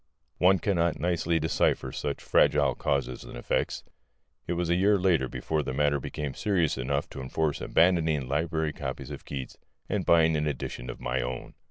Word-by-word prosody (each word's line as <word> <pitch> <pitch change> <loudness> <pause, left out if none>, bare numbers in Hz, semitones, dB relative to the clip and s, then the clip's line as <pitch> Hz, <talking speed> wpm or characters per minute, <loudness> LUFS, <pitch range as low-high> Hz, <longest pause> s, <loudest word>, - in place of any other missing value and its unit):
One 95 +2 +5
cannot 85 -2 0
nicely 85 -1 +1
decipher 75 -4 +1
such - - -4
fragile 70 -3 +3
causes 65 -3 -2
and - - -9
effects. - - -1 0.6
It - - 0
was 85 0 -1
a - - +4
year 100 +3 +4
later 90 -8 +2
before 80 -1 -2
the 65 -2 -4
matter 70 0 +2
became 70 +1 -4
serious 90 -7 +1
enough 70 +2 -1
to 70 - -7
enforce 75 +3 -1
abandoning 80 -5 +2
library 80 +2 -1
copies 65 -2 -5
of - - -8
Keats 65 -2 -6 0.3
and - - -1
buying 80 -1 +4
an 75 0 0
edition 65 -3 -4
of - - -6
my 65 +2 -1
own. 60 -1 -5
75 Hz, 175 wpm, -28 LUFS, 65-85 Hz, 0.6 s, One